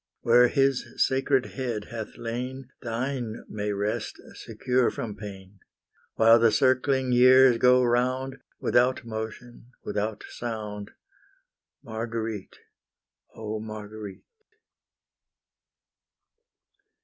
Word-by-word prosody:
Where 120 +1 +6
His 135 0 +2
sacred 135 -1 +2
head 120 -6 -4
hath 115 -2 -6
lain, 125 +3 -5
Thine 120 -1 -3
may 105 -1 -3
rest, 100 +1 -3
secure 125 -1 0
from 105 -3 -5
pain. 100 -1 -10 0.6
While 115 +1 +6
the 115 -1 +5
circling 130 0 +2
years 130 0 +6
go 125 0 +5
round, 130 +2 0 0.2
Without 125 0 +2
motion, 115 +2 -7
without 105 +1 -3
sound, 105 -3 -6 0.9
Marguerite, 110 -2 -5 0.8
oh 110 -1 -4
Marguerite! 105 -2 -8
120 Hz, 90 wpm, -26 LUFS, 110-130 Hz, 0.9 s, Where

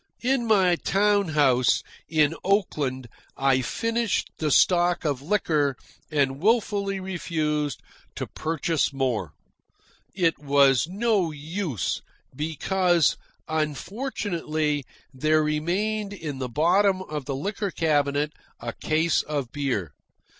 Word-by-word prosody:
In 250 -1 +1
my 190 -5 +4
town 200 +1 +2
house, 135 -5 +3 0.3
in 155 -1 +3
Oakland, 145 - 0 0.3
I 135 -1 +3
finished 230 - -1
the 155 - 0
stock 175 +3 +3
of 140 -4 0
liquor 150 -5 +1 0.3
and 140 -2 0
wilfully 200 -2 +1
refused 155 -6 -2 0.3
to - - -3
purchase 160 -1 -1
more. 125 - -1 0.8
It 170 -4 +1
was 140 -1 +4
no 205 -2 +1
use, 155 - -3 0.3
because, 170 +3 +2 0.3
unfortunately, 155 - -2 0.3
there 155 +4 +2
remained 195 +8 -1
in 150 -8 -6
the 130 -1 -3
bottom 185 - +3
of 150 -5 -5
the 140 - -3
liquor 200 +7 -2
cabinet 150 -3 +1 0.3
a 115 0 -5
case 160 +1 +1
of 140 -5 -3
beer. 125 - -2
155 Hz, 110 wpm, -25 LUFS, 145-190 Hz, 0.8 s, my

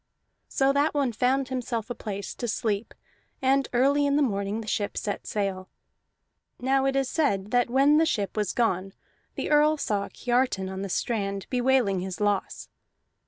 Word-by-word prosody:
So 270 0 +2
that 290 +2 +1
one 275 -4 +1
found 255 +4 +1
himself 245 -3 -3
a - - 0
place 200 -4 -6
to 240 - -5
sleep, 215 -1 -2 0.4
and 270 +1 +2
early 280 +4 +3
in 280 - +2
the 295 - +3
morning 200 -2 -1
the 215 - -10
ship 205 -1 -2
set 205 - -3
sail. 195 -3 -2 0.9
Now 265 +1 +2
it 270 - 0
is 270 -1 +1
said 210 - 0
that 245 -1 +2
when 275 +4 +4
the 325 - +4
ship 205 - -1
was 210 -3 0
gone 195 -5 0 0.4
the - - -3
Earl 300 +1 +4
saw 205 -7 -1
Kiartan 240 -6 0
on 190 0 -5
the 200 - -4
strand 200 -1 -2
bewailing 250 -6 +2
his 185 0 -5
loss. 205 -2 -1
240 Hz, 170 wpm, -26 LUFS, 200-270 Hz, 0.9 s, when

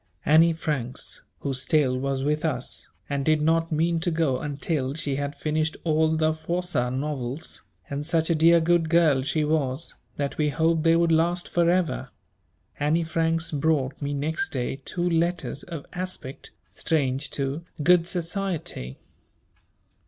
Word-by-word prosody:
Annie 165 +2 +6
Franks, 145 -6 -4 0.2
who 140 - -2
still 135 0 +2
was 135 0 -1
with 150 +2 0
us, 130 -6 -3 0.2
and 140 -1 -1
did 155 +1 +3
not 165 +2 +2
mean 165 +2 +1
to 175 - 0
go 160 -6 +1
until 145 -1 -2
she 145 -4 -2
had 145 0 -3
finished 155 +1 -1
all 160 0 +2
the 155 0 +2
Froissart 160 -5 -2
novels, 140 +1 -3 0.3
and 140 +1 -3
such 160 +1 +1
a - - +5
dear 165 +2 +5
good 165 0 +2
girl 160 -5 +4
she 150 +3 0
was, 150 -1 -1 0.2
that 140 +1 -3
we 150 -1 +3
hoped 160 +2 +2
they 165 +1 +4
would 170 0 +3
last 170 +2 +2
for 170 -1 +2
ever, 180 -1 0 0.7
Annie 155 +4 +2
Franks 165 0 0
brought 145 -2 0
me 145 0 -2
next 150 +3 -1
day 135 +1 -3
two 175 0 -1
letters 170 -3 0
of 165 -5 -7
aspect 180 -7 -6 0.2
strange 140 -3 -1
to 140 +3 -2 0.2
"good 175 +1 +5
society." 175 - -3
155 Hz, 150 wpm, -25 LUFS, 140-165 Hz, 0.7 s, Annie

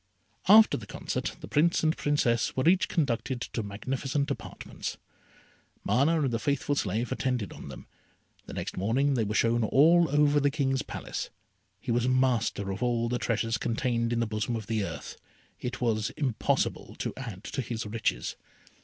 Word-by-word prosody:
After 215 +3 +8
the 105 - -9
concert - - -3
the - - -7
Prince 165 +3 +2
and 160 0 +3
Princess 125 -6 +1
were 130 - +2
each 185 +2 +4
conducted 130 -5 -1
to 115 - -4
magnificent 135 +7 -2
apartments. - - -6 0.9
Mana 145 +9 +2
and 135 - +1
the 115 - -1
faithful 140 +1 0
slave 115 -1 -1
attended 125 -6 -1
on - - -10
them. - - -9 0.6
The - - -7
next - - -4
morning 125 +9 +2
they 120 -4 +1
were 105 0 -2
shown 115 0 +3
all 160 +9 +5
over 145 0 +4
the 145 0 +3
King's 135 -2 0
Palace. - - -5 0.5
He 120 +4 -4
was 120 +1 +2
master 125 -6 +1
of 95 - -5
all 120 -1 +1
the 125 0 -1
treasures 115 0 0
contained 115 0 0
in 120 - +1
the - - +2
bosom 110 +2 -2
of 110 -2 -4
the 110 -1 -1
earth. - - -6 0.4
It 125 - -5
was 110 -2 +1
impossible 135 -7 -1
to - - -3
add 115 -7 -7
to 135 - -3
his 115 -2 -4
riches. 105 - -2
125 Hz, 170 wpm, -28 LUFS, 115-140 Hz, 0.9 s, After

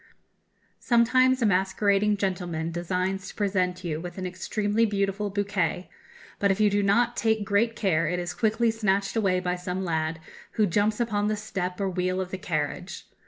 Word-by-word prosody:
Sometimes 255 +2 +3
a - - +4
masquerading 200 +1 +2
gentleman 175 -4 -2
designs 185 +3 -2
to - - -9
present 185 -3 0
you 160 -2 -3
with 175 +1 -8
an 185 - -4
extremely 205 +4 -1
beautiful 200 -1 0
bouquet; 195 -3 -1 0.5
but 200 - +2
if 195 +1 +1
you 210 -1 +4
do 205 +1 +2
not 235 +4 +2
take 220 -2 +1
great 220 +3 +1
care 165 -6 +1
it 180 +2 -1
is 175 0 -3
quickly 225 +1 +1
snatched 200 -3 0
away 195 -5 +2
by 180 0 -1
some 180 +1 -4
lad, 160 -1 -1 0.3
who 215 - +3
jumps 205 +4 +1
upon 210 -3 0
the 215 0 0
step 190 -3 -4
or 200 - 0
wheel 185 0 -1
of 185 -1 -4
the 190 - -4
carriage.... 160 +1 -3
195 Hz, 175 wpm, -26 LUFS, 180-210 Hz, 0.5 s, a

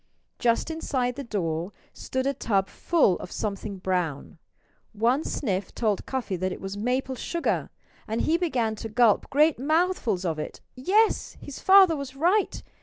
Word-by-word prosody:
Just 235 +6 +1
inside 255 -6 -1
the 280 - -5
door 175 -5 -2 0.2
stood 260 0 -3
a 275 - +1
tub 195 -7 0
full 310 - +2
of - - -8
something 200 -1 -4
brown. 180 -5 -2 0.5
One 240 +7 +2
sniff 195 -7 -2
told 215 -4 -1
Cuffy 255 -7 -2
that 185 +1 -1
it - - -6
was 195 +1 -5
maple 250 +5 -1
sugar 335 +7 -2 0.4
and 220 +1 -1
he 320 - +2
began 255 -11 0
to 225 - -6
gulp 225 -1 +3
great 300 -1 +3
mouthfuls 300 - +1
of 160 -3 -1
it. - - -6 0.2
Yes! 400 +12 +2
his 285 - -9
father 380 -3 +7
was 280 -2 -6
right. 360 +8 +1
245 Hz, 160 wpm, -26 LUFS, 195-295 Hz, 0.5 s, father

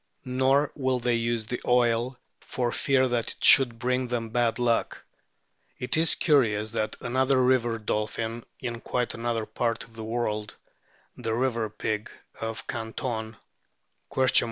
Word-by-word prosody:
Nor 130 +3 +2
will 130 -3 0
they 120 0 +1
use 115 -1 0
the 125 +3 -4
oil 125 +1 +2 0.2
for 120 -2 -2
fear 130 0 +2
that 120 -2 -1
it - - -13
should 120 -4 +7
bring 125 +1 0
them 120 -2 -2
bad 120 -1 +1
luck. 120 -2 0 0.7
It 125 - -2
is 160 +1 +3
curious 110 -9 +2
that 110 -1 -2
another 130 +2 +2
river 120 -2 +2
dolphin 110 +2 -3 0.2
in 120 -2 -5
quite 125 -1 -1
another 115 -1 -2
part 115 0 -2
of 115 - -17
the 110 0 -7
world, 110 -2 -2 0.6
the 115 -2 -2
"river 115 -3 0
pig" 105 0 -3 0.3
of 115 0 -5
Canton 110 -1 -4
120 Hz, 140 wpm, -27 LUFS, 115-125 Hz, 0.7 s, should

